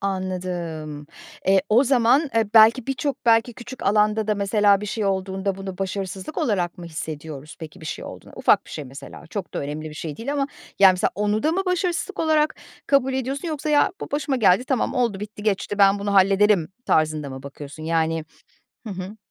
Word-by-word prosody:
Anladım. 175 Hz, -6 st, -4 dB, 0.4 s
E, 195 Hz, -1 st, +5 dB
o 235 Hz, +6 st, +5 dB
zaman, 265 Hz, +3 st, +3 dB
e, 220 Hz, -1 st, +1 dB
belki 225 Hz, +3 st, +7 dB
birçok 270 Hz, 0 st, -3 dB
belki 230 Hz, +1 st, +4 dB
küçük 245 Hz, +1 st, -9 dB
alanda 210 Hz, +1 st, +2 dB
da 210 Hz, -, +3 dB
mesela 200 Hz, 0 st, +3 dB
bir 210 Hz, -, -5 dB
şey 215 Hz, 0 st, -2 dB
olduğunda 190 Hz, 0 st, -1 dB
bunu 195 Hz, -1 st, -7 dB
başarısızlık 195 Hz, -, -4 dB
olarak 195 Hz, -, 0 dB
mı 175 Hz, -, -8 dB
hissediyoruz 155 Hz, -2 st, -7 dB
peki 160 Hz, +3 st, -9 dB
bir 160 Hz, -, -9 dB
şey -, -, -5 dB
olduğunda? -, -, -10 dB
Ufak -, -, +3 dB
bir -, -, -13 dB
şey 150 Hz, -, -6 dB
mesela, 135 Hz, +4 st, -11 dB
çok 185 Hz, 0 st, -6 dB
da -, -, -1 dB
önemli 150 Hz, +2 st, -5 dB
bir -, -, -10 dB
şey 155 Hz, -2 st, -6 dB
değil 275 Hz, +5 st, -4 dB
ama, 280 Hz, -1 st, 0 dB, 0.3 s
yani, 195 Hz, -1 st, +8 dB
misal 180 Hz, -, +1 dB
onu 210 Hz, +2 st, 0 dB
da 315 Hz, +2 st, +2 dB
mı 385 Hz, +2 st, 0 dB
başarısızlık 360 Hz, +1 st, -1 dB
olarak 310 Hz, -1 st, +2 dB, 0.3 s
kabul 270 Hz, -2 st, +3 dB
ediyorsun 270 Hz, +5 st, -3 dB
yoksa 305 Hz, 0 st, -3 dB
“ya 295 Hz, +3 st, +4 dB
bu -, -, -6 dB
başıma 290 Hz, -2 st, -1 dB
geldi, 200 Hz, +1 st, +4 dB
tamam 265 Hz, +1 st, 0 dB
oldu 230 Hz, -6 st, 0 dB
bitti 210 Hz, 0 st, -8 dB
geçti, 205 Hz, 0 st, -1 dB
ben 200 Hz, 0 st, +5 dB
bunu 200 Hz, 0 st, -2 dB
hallederim“ 195 Hz, -2 st, +4 dB, 0.2 s
tarzında 155 Hz, -2 st, +1 dB
mı 130 Hz, 0 st, -8 dB
bakıyorsun? 145 Hz, +2 st, -9 dB
Yani, 160 Hz, 0 st, 0 dB, 0.6 s
hı -, -, -4 dB
hı. 190 Hz, +3 st, -7 dB
200 Hz, 195 wpm, -23 LUFS, 175-245 Hz, 0.6 s, yani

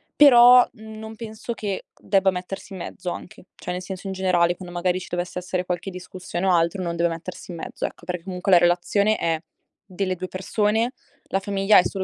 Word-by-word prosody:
però, 250 Hz, -3 st, +8 dB
mhmm, 220 Hz, -2 st, -11 dB
non 220 Hz, 0 st, -8 dB
penso 220 Hz, +1 st, -6 dB
che 205 Hz, -4 st, -4 dB
debba 195 Hz, -1 st, +3 dB
mettersi 185 Hz, +2 st, -6 dB
in 190 Hz, -, -7 dB
mezzo 180 Hz, -, -5 dB
anche. 180 Hz, -, -9 dB
Cioè 180 Hz, -, -5 dB
nel 180 Hz, -, -4 dB
senso 190 Hz, +1 st, -7 dB
in 190 Hz, -, -3 dB
generale 180 Hz, -2 st, +2 dB
quando 180 Hz, -1 st, -10 dB
magari 180 Hz, +1 st, +1 dB
ci 180 Hz, -, -9 dB
dovesse 175 Hz, +1 st, -3 dB
essere 180 Hz, 0 st, -3 dB
qualche 180 Hz, +2 st, -3 dB
discussione 180 Hz, 0 st, -5 dB
o 185 Hz, -, +4 dB
altro 170 Hz, +3 st, +2 dB
non 170 Hz, -1 st, -2 dB
deve 170 Hz, 0 st, +2 dB
mettersi 165 Hz, +3 st, -7 dB
in 170 Hz, -, -7 dB
mezzo, -, -, -5 dB
ecco, -, -, -7 dB
perché 180 Hz, -1 st, -4 dB
comunque 185 Hz, +1 st, -2 dB
la 180 Hz, -, +8 dB
relazione 180 Hz, +5 st, +2 dB
è 165 Hz, -1 st, 0 dB, 0.5 s
delle 185 Hz, -1 st, -2 dB
2 185 Hz, +1 st, -5 dB
persone, 215 Hz, +5 st, 0 dB, 0.3 s
la 195 Hz, -, -1 dB
famiglia 195 Hz, +1 st, +4 dB
è -, -, +4 dB
solo 195 Hz, -2 st, -2 dB
185 Hz, 210 wpm, -24 LUFS, 180-205 Hz, 0.5 s, però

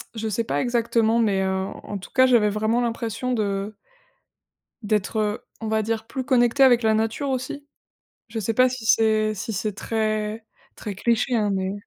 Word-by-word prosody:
Je 220 Hz, 0 st, -3 dB
sais 225 Hz, +2 st, -1 dB
pas -, -, -1 dB
exactement 235 Hz, -2 st, +1 dB
mais 200 Hz, -4 st, +2 dB
en 190 Hz, 0 st, -2 dB
en 205 Hz, -, -5 dB
tout 185 Hz, -, -11 dB
cas 260 Hz, -1 st, +5 dB
j'avais 235 Hz, -5 st, +4 dB
vraiment 215 Hz, +3 st, 0 dB
l'impression 235 Hz, +1 st, -2 dB
de 205 Hz, -2 st, -2 dB, 1.1 s
d'être, 210 Hz, +1 st, -1 dB
heu, 210 Hz, 0 st, 0 dB, 0.2 s
on 225 Hz, -, -4 dB
va 220 Hz, 0 st, +1 dB
dire, 220 Hz, +1 st, -2 dB
plus 260 Hz, -, -4 dB
connectée 250 Hz, 0 st, +3 dB
avec 245 Hz, -2 st, +5 dB
la 220 Hz, 0 st, +3 dB
nature 225 Hz, +6 st, -1 dB
aussi. 260 Hz, +2 st, -4 dB, 0.6 s
Je 225 Hz, +1 st, -5 dB
sais 220 Hz, +1 st, -1 dB
pas 255 Hz, +2 st, +5 dB
si 250 Hz, -2 st, -6 dB
c'est 215 Hz, -1 st, +3 dB
si 215 Hz, +2 st, -5 dB
c'est 210 Hz, +2 st, -2 dB
très 215 Hz, +1 st, -2 dB, 0.3 s
très 210 Hz, -, -6 dB
cliché 235 Hz, +5 st, 0 dB
hein, 215 Hz, -3 st, +2 dB
mais 190 Hz, -1 st, -1 dB
220 Hz, 180 wpm, -23 LUFS, 210-235 Hz, 1.1 s, cas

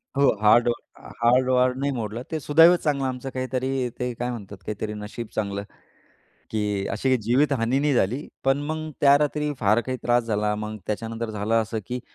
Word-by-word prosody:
हो, 140 Hz, 0 st, +4 dB
हाड 110 Hz, +3 st, +5 dB, 0.6 s
हाड 125 Hz, +2 st, +4 dB
वाड 125 Hz, 0 st, +3 dB
नाही 140 Hz, +1 st, 0 dB
मोडलं. 115 Hz, 0 st, -4 dB
ते 160 Hz, -, -1 dB
सुदैव 165 Hz, +4 st, +6 dB
चांगलं 140 Hz, -2 st, +1 dB
आमचं 130 Hz, +1 st, -4 dB
काहीतरी 130 Hz, 0 st, -2 dB
ते 125 Hz, 0 st, -2 dB
काय 120 Hz, -, -1 dB
म्हणतात? 105 Hz, -4 st, -8 dB
काहीतरी 105 Hz, 0 st, -4 dB
नशीब 105 Hz, +2 st, -6 dB
चांगलं, 100 Hz, -2 st, -2 dB, 0.9 s
की 105 Hz, -2 st, -1 dB
अशी 135 Hz, -, -1 dB
काही 130 Hz, -1 st, +3 dB
जीवित 135 Hz, +5 st, +3 dB
हानी 120 Hz, +4 st, +1 dB
नाही 145 Hz, +1 st, +1 dB
झाली. 125 Hz, +6 st, 0 dB, 0.2 s
पण 135 Hz, +1 st, +3 dB
मग 155 Hz, 0 st, -4 dB
त्या 140 Hz, 0 st, +7 dB
रात्री 150 Hz, 0 st, 0 dB
फार 105 Hz, +2 st, +3 dB
काही 130 Hz, -, -2 dB
त्रास 120 Hz, 0 st, +3 dB
झाला. 105 Hz, -1 st, 0 dB
मग 110 Hz, 0 st, -5 dB
त्याच्यानंतर 115 Hz, +1 st, -3 dB
झालं 105 Hz, +1 st, -2 dB
असं 110 Hz, +1 st, -4 dB
की 125 Hz, +1 st, -4 dB
125 Hz, 185 wpm, -24 LUFS, 110-135 Hz, 0.9 s, त्या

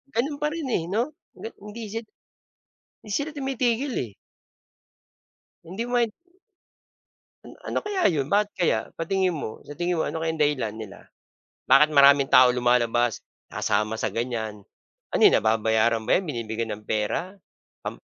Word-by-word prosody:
Ganun 285 Hz, +5 st, 0 dB
pa 300 Hz, -, +1 dB
rin, 320 Hz, -5 st, -4 dB
eh, 170 Hz, -, +1 dB
'no? 230 Hz, +10 st, -1 dB, 0.2 s
Ga 225 Hz, -, -7 dB
hindi 210 Hz, +3 st, -9 dB
si 225 Hz, -, -2 dB, 1.0 s
'di 210 Hz, -, -9 dB
sila 285 Hz, +8 st, -1 dB
tumitigil, 265 Hz, -1 st, -1 dB
eh. 110 Hz, -, -13 dB, 1.5 s
Hindi 190 Hz, +8 st, -5 dB
mo 245 Hz, -, -5 dB
main 235 Hz, -2 st, +2 dB, 1.3 s
An -, -, -11 dB, 0.2 s
ano -, -, 0 dB
kaya 390 Hz, -, +2 dB
'yon? 145 Hz, -5 st, -1 dB
Bakit 205 Hz, 0 st, +3 dB
kaya? 175 Hz, -, +2 dB, 0.2 s
Sa 165 Hz, -, -2 dB
tingin 190 Hz, -3 st, +1 dB
mo? 110 Hz, -7 st, -6 dB
Sa 145 Hz, -, -7 dB
tingin 175 Hz, 0 st, 0 dB
mo -, -, +2 dB
ano 160 Hz, -, -3 dB
kayang 160 Hz, -1 st, -2 dB
dahilan 135 Hz, -8 st, +1 dB
nila? 110 Hz, -3 st, -9 dB, 0.7 s
Bakit 135 Hz, +4 st, +6 dB
maraming 140 Hz, -1 st, +6 dB
tao 130 Hz, 0 st, +8 dB
lumalabas, 120 Hz, -1 st, +2 dB, 0.3 s
sasama 110 Hz, +2 st, 0 dB
sa -, -, 0 dB
ganyan? 110 Hz, -3 st, -3 dB, 0.5 s
Ano -, -, 0 dB
yun, -, -, +7 dB
nababayaran 110 Hz, +1 st, +2 dB
ba -, -, +1 dB
'yan? 190 Hz, -, 0 dB
Binibigyan 115 Hz, -2 st, -3 dB
ng 105 Hz, -, -16 dB
pera? 135 Hz, -, -2 dB, 0.5 s
Um -, -, -5 dB
150 Hz, 155 wpm, -25 LUFS, -, 1.5 s, tao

